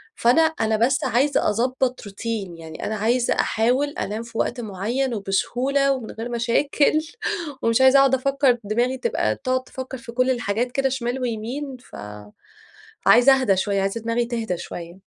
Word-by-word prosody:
فأنا 245 Hz, +7 st, +4 dB
أنا 225 Hz, -9 st, +1 dB
بس 260 Hz, +6 st, +2 dB
عايزة 265 Hz, 0 st, +2 dB
أظبط 250 Hz, +3 st, 0 dB
روتين 200 Hz, -3 st, -5 dB
يعني 160 Hz, -1 st, -8 dB
أنا 215 Hz, -, -2 dB
عايزة 235 Hz, +4 st, +1 dB
أحاول 250 Hz, +6 st, +1 dB
أنام 220 Hz, -4 st, -4 dB
في 230 Hz, -1 st, -10 dB
وقت 245 Hz, 0 st, -1 dB
معيّن 225 Hz, +6 st, -2 dB
وبسهولة 250 Hz, +7 st, 0 dB
ومن 245 Hz, -4 st, -6 dB
غير 230 Hz, +2 st, -6 dB
مشاكل 265 Hz, +6 st, +2 dB, 0.6 s
ومش 230 Hz, +2 st, +3 dB
عايزة 265 Hz, +1 st, +7 dB
أقعد 270 Hz, -1 st, +5 dB
أفكّر 275 Hz, -1 st, +2 dB
دماغي 240 Hz, +5 st, 0 dB
تبقى 475 Hz, -, 0 dB
تقعد 255 Hz, -1 st, -1 dB
تفكّر 260 Hz, 0 st, -7 dB
في 235 Hz, -1 st, -10 dB
كل 255 Hz, +2 st, +2 dB
الحاجات 240 Hz, 0 st, -1 dB
كده 270 Hz, 0 st, +1 dB
شمال 255 Hz, 0 st, -3 dB
ويمين 250 Hz, +4 st, -4 dB
فعايزة 105 Hz, -, -12 dB, 0.9 s
أهدى 200 Hz, -7 st, +2 dB
شويّة 195 Hz, +1 st, 0 dB
عايزة 195 Hz, +4 st, -2 dB
دماغي 230 Hz, +1 st, 0 dB
تهدى 230 Hz, -6 st, -3 dB
شويّة. 170 Hz, +2 st, -9 dB
240 Hz, 155 wpm, -23 LUFS, 215-260 Hz, 0.9 s, عايزة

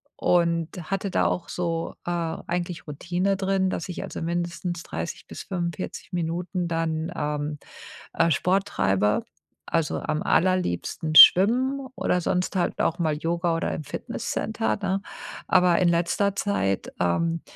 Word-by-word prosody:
und 170 Hz, -2 st, +2 dB, 0.2 s
hatte 195 Hz, 0 st, -2 dB
da -, -, +2 dB
auch 175 Hz, -, -1 dB
so, 165 Hz, -2 st, -2 dB
äh, -, -, -3 dB
eigentlich 175 Hz, 0 st, -3 dB
Routine 175 Hz, +6 st, -1 dB
drin, 190 Hz, -1 st, +1 dB
dass 185 Hz, -, -4 dB
ich 180 Hz, -, -5 dB
also -, -, -6 dB
mindestens 170 Hz, +1 st, -3 dB
30 170 Hz, -, -6 dB
bis -, -, -8 dB
45 175 Hz, 0 st, -5 dB
Minuten 175 Hz, +1 st, -2 dB
dann, 165 Hz, 0 st, -1 dB
ähm, 150 Hz, -1 st, -2 dB, 0.6 s
äh, 165 Hz, 0 st, +3 dB
Sport 185 Hz, +6 st, +2 dB
treibe, 100 Hz, -, +1 dB, 0.4 s
also 165 Hz, -2 st, 0 dB
am 155 Hz, +1 st, -2 dB
allerliebsten 160 Hz, -, 0 dB
schwimmen 255 Hz, -, +7 dB
oder 180 Hz, -, 0 dB
sonst 180 Hz, +3 st, -1 dB
halt 180 Hz, -, 0 dB
auch 165 Hz, -, +1 dB
mal 155 Hz, -3 st, 0 dB
Yoga 170 Hz, +1 st, 0 dB
oder 165 Hz, -, -1 dB
im -, -, -4 dB
Fitnesscenter, 110 Hz, -5 st, -2 dB
ne? 195 Hz, +1 st, 0 dB, 0.5 s
Aber 180 Hz, -2 st, +4 dB
in 180 Hz, -, +4 dB
letzter 175 Hz, +4 st, +1 dB
Zeit, 200 Hz, -, -1 dB
ähm, 165 Hz, -, +1 dB
170 Hz, 140 wpm, -25 LUFS, 160-185 Hz, 0.6 s, schwimmen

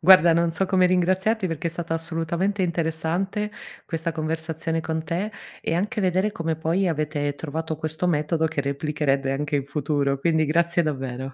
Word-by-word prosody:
Guarda, 175 Hz, -1 st, +8 dB
non 170 Hz, 0 st, +3 dB
so 165 Hz, +4 st, 0 dB
come 185 Hz, -1 st, +4 dB
ringraziarti, 185 Hz, +4 st, +2 dB
perché 165 Hz, -1 st, -2 dB
è -, -, -6 dB
stata 170 Hz, 0 st, -3 dB
assolutamente 170 Hz, +4 st, -1 dB
interessante, 170 Hz, +5 st, -1 dB, 0.4 s
questa 165 Hz, 0 st, -2 dB
conversazione 160 Hz, +1 st, -2 dB
con 160 Hz, 0 st, -3 dB
te, 175 Hz, +7 st, -2 dB, 0.3 s
e -, -, -1 dB
anche 205 Hz, +5 st, 0 dB
vedere 190 Hz, +2 st, +2 dB
come 165 Hz, -3 st, -2 dB
poi 170 Hz, +4 st, +1 dB
avete 150 Hz, -2 st, -1 dB
trovato 160 Hz, +1 st, -3 dB
questo 160 Hz, +3 st, -2 dB
metodo, 160 Hz, 0 st, +1 dB
che 160 Hz, -2 st, -1 dB
replicherete 140 Hz, -1 st, 0 dB
anche 145 Hz, +1 st, -1 dB
in 140 Hz, -, -2 dB
futuro. 140 Hz, -1 st, 0 dB
Quindi, 160 Hz, +2 st, +2 dB
grazie 170 Hz, +3 st, +2 dB
davvero. 135 Hz, -3 st, -3 dB
160 Hz, 165 wpm, -24 LUFS, 150-175 Hz, 0.4 s, Guarda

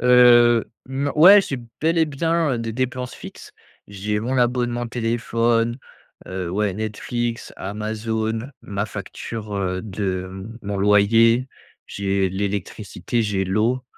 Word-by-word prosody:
Heu, 120 Hz, -1 st, +6 dB, 0.2 s
non 140 Hz, +2 st, -2 dB
ouais, 195 Hz, +6 st, +9 dB
j'ai 135 Hz, -8 st, -4 dB, 0.2 s
bel 165 Hz, +2 st, +2 dB
et 160 Hz, -, +4 dB
bien, 160 Hz, +3 st, -1 dB, 0.2 s
heu, 120 Hz, -, -1 dB
des 115 Hz, -1 st, -4 dB
dépenses 125 Hz, +1 st, -3 dB
fixes. -, -, -11 dB, 0.4 s
J'ai 105 Hz, +1 st, -3 dB
mon 125 Hz, +4 st, -2 dB
abonnement 120 Hz, 0 st, 0 dB
téléphone, 115 Hz, 0 st, 0 dB, 0.5 s
heu, 95 Hz, -2 st, -4 dB
ouais, 105 Hz, +1 st, 0 dB
Netflix, 115 Hz, +2 st, -3 dB
Amazon, 110 Hz, +3 st, -3 dB
ma 100 Hz, +1 st, -3 dB
facture, 105 Hz, +1 st, -7 dB
heu, 95 Hz, -1 st, -2 dB
de 95 Hz, -1 st, -4 dB, 0.2 s
mon 100 Hz, 0 st, -3 dB
loyer, 115 Hz, +5 st, +4 dB, 0.4 s
j'ai 100 Hz, -1 st, -1 dB
l'électricité, 100 Hz, +3 st, -3 dB
j'ai 100 Hz, -3 st, -1 dB
l'eau 110 Hz, +7 st, 0 dB
115 Hz, 125 wpm, -22 LUFS, 100-120 Hz, 0.5 s, ouais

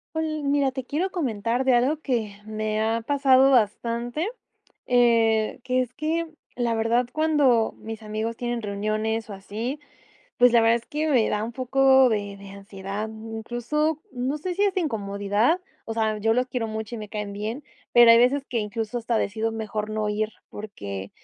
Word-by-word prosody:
Hol 310 Hz, -2 st, -2 dB
mira, 280 Hz, -1 st, +1 dB
te 265 Hz, -1 st, -4 dB
quiero 310 Hz, +9 st, -1 dB
comentar 240 Hz, -, -1 dB
de 260 Hz, -1 st, +3 dB
algo 265 Hz, +6 st, +2 dB
que 230 Hz, -8 st, -1 dB
me 215 Hz, 0 st, -2 dB
ha 225 Hz, +1 st, +1 dB
pasado 270 Hz, +1 st, +4 dB
bastante, 240 Hz, -, +1 dB, 0.6 s
eh, 230 Hz, -2 st, +3 dB
que 255 Hz, 0 st, 0 dB
es 250 Hz, -1 st, -5 dB
que 320 Hz, +3 st, -1 dB, 0.3 s
la 235 Hz, -2 st, 0 dB
verdad 230 Hz, +2 st, +1 dB
cuando 290 Hz, -8 st, +3 dB
mis 225 Hz, 0 st, -8 dB
amigos 215 Hz, +2 st, -3 dB
tienen 240 Hz, 0 st, -3 dB
reuniones 215 Hz, +2 st, -2 dB
o -, -, -5 dB
así, 220 Hz, +8 st, -5 dB, 0.6 s
pues, 245 Hz, -1 st, +5 dB
la 235 Hz, -, +6 dB
verdad 225 Hz, +1 st, +4 dB
es 235 Hz, -, -8 dB
que 305 Hz, +1 st, -2 dB
me 250 Hz, -7 st, +3 dB
da 210 Hz, 0 st, -1 dB
un 225 Hz, -, -3 dB
poco 265 Hz, +1 st, +4 dB
de 205 Hz, -3 st, -2 dB
de 200 Hz, 0 st, -12 dB
ansiedad. 200 Hz, +1 st, -6 dB
Incluso, 240 Hz, +8 st, -2 dB
no 255 Hz, +4 st, -2 dB
sé, 360 Hz, +4 st, -3 dB
si 400 Hz, +3 st, +2 dB
hasta 390 Hz, -2 st, +1 dB
incomodidad, 210 Hz, -, 0 dB, 0.3 s
o 225 Hz, -, -4 dB
sea, 220 Hz, -1 st, 0 dB
yo 225 Hz, +2 st, +2 dB
los 250 Hz, +1 st, +1 dB
quiero 245 Hz, -3 st, -3 dB
mucho, 220 Hz, +1 st, -5 dB
y -, -, -5 dB
me 210 Hz, -1 st, -7 dB
caen 210 Hz, -1 st, -5 dB
bien, 220 Hz, +7 st, -5 dB, 0.3 s
pero 240 Hz, -1 st, +8 dB
hay 230 Hz, -, +7 dB
veces 260 Hz, +4 st, +3 dB
que, 240 Hz, -, -1 dB
incluso, 220 Hz, +2 st, -3 dB
hasta 235 Hz, -1 st, 0 dB
decido 220 Hz, +2 st, -1 dB
mejor 215 Hz, -1 st, -4 dB
no 215 Hz, -1 st, -1 dB
ir. 215 Hz, +1 st, 0 dB, 0.2 s
Porque 100 Hz, -, -7 dB
230 Hz, 180 wpm, -25 LUFS, 215-260 Hz, 0.6 s, pero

